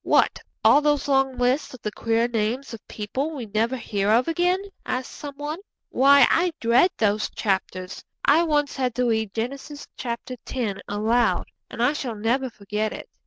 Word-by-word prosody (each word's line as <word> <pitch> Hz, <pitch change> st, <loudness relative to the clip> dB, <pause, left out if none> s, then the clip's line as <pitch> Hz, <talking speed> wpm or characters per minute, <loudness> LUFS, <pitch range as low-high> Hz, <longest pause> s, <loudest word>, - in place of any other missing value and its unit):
'What, -, -, +3 dB, 0.2 s
all 290 Hz, -, +6 dB
those 295 Hz, -1 st, +1 dB
long 270 Hz, -2 st, +2 dB
lists 255 Hz, +2 st, 0 dB
of 245 Hz, -, -16 dB
the 210 Hz, -, -2 dB
queer 230 Hz, +2 st, +1 dB
names 240 Hz, +3 st, -2 dB
of 225 Hz, -, -10 dB
people 265 Hz, +9 st, -3 dB
we 250 Hz, -5 st, -5 dB
never 220 Hz, +5 st, 0 dB
hear 205 Hz, -4 st, -1 dB
of 235 Hz, +4 st, +4 dB
again?' 355 Hz, +3 st, +1 dB, 0.2 s
asks 255 Hz, 0 st, -3 dB
some 285 Hz, -1 st, -8 dB
one. 295 Hz, +4 st, -5 dB, 0.3 s
'Why, 280 Hz, +1 st, +6 dB
I 345 Hz, +1 st, +2 dB
dread 240 Hz, +9 st, +4 dB
those 215 Hz, 0 st, +1 dB
chapters. 190 Hz, -2 st, -3 dB, 0.2 s
I 300 Hz, +4 st, +5 dB
once 295 Hz, -3 st, +1 dB
had 255 Hz, -3 st, -1 dB
to 250 Hz, -, +1 dB
read 220 Hz, -3 st, 0 dB
Genesis 275 Hz, +5 st, -5 dB, 0.2 s
x. 240 Hz, -2 st, -4 dB
aloud, 220 Hz, +3 st, +1 dB, 0.2 s
and 230 Hz, -, -3 dB
I 260 Hz, +4 st, +3 dB
shall 255 Hz, -6 st, -4 dB
never 240 Hz, +5 st, 0 dB
forget 210 Hz, 0 st, -3 dB
it!' -, -, -9 dB
245 Hz, 170 wpm, -24 LUFS, 220-280 Hz, 0.3 s, all